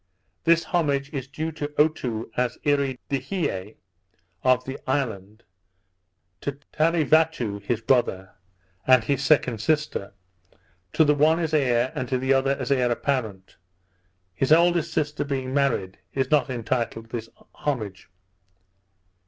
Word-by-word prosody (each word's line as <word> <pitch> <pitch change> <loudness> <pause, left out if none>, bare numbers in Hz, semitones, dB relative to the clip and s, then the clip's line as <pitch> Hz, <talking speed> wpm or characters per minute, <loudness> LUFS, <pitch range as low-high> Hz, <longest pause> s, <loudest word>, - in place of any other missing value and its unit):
This 165 0 +4
homage 145 -5 0
is 135 -2 -4
due 155 +4 -4
to 150 -2 -4
Otoo 125 -8 0
as 125 -1 0
Earee 140 -3 +1
de 140 - 0
hie 110 - -3 0.7
of 130 -1 +3
the 135 +1 -6
isle, 110 -7 -2 1.0
to 140 - -2 0.2
Tarevatou, 155 -8 +2
his 115 +3 -2
brother, 110 -6 +1 0.6
and 130 -3 +6
his 140 +4 0
second 130 -6 +2
sister; 150 -8 -1 0.8
to - - +5
the 150 -1 +4
one 155 +3 +4
as 165 -2 -2
heir, 125 -4 +2
and 130 -2 -4
to 130 - +1
the 130 +2 +2
other 135 +1 +2
as 130 0 -3
heir 125 -3 +3
apparent; 115 -7 -2 0.8
his 135 +9 -1
eldest 170 0 +4
sister 150 -1 -1
being 135 -2 -3
married, 125 -10 0 0.2
is 135 0 0
not 145 -3 +3
entitled 115 -2 -3
to - - -2
this 115 0 -8 0.2
homage. 105 -12 -4
135 Hz, 135 wpm, -25 LUFS, 120-150 Hz, 1.0 s, and